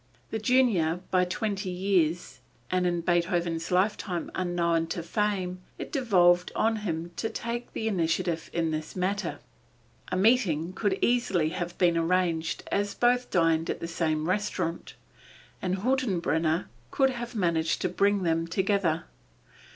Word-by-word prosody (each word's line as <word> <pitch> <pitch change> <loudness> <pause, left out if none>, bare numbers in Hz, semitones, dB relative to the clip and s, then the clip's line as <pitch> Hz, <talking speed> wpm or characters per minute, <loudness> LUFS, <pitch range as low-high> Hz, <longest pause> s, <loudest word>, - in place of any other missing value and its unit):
The 220 - -2
junior 215 -9 +2
by 185 -1 +3
twenty 195 +1 -2
years, 175 -6 0 0.3
and 180 -1 +2
in 175 -1 0
Beethoven's 170 -1 0
lifetime 185 -1 0
unknown 170 -2 0
to 165 +1 -4
fame, 185 0 -1 0.2
it - - -7
devolved 180 - +3
on 225 0 +2
him 170 -5 -3
to 225 - -1
take 235 +1 -4
the 225 - -2
initiative 170 -3 0
in 165 -1 0
this 155 0 -4
matter. 185 -4 -1 0.7
A 185 - 0
meeting 185 -6 +2
could 195 0 0
easily 195 -10 +2
have 175 +1 -4
been 170 -2 +3
arranged 165 -1 0
as 205 0 0
both 245 +1 +2
dined 165 -2 +2
at - - -2
the 170 - -4
same 160 -2 -1
restaurant, 185 -3 -2 0.7
and 185 0 -1
Hüttenbrenner 180 - +1 0.2
could 265 - +2
have 240 -1 -6
managed 165 -5 +1
to - - +1
bring 200 +2 +2
them 165 -1 +1
together. 185 -2 +1
180 Hz, 140 wpm, -28 LUFS, 165-205 Hz, 0.7 s, by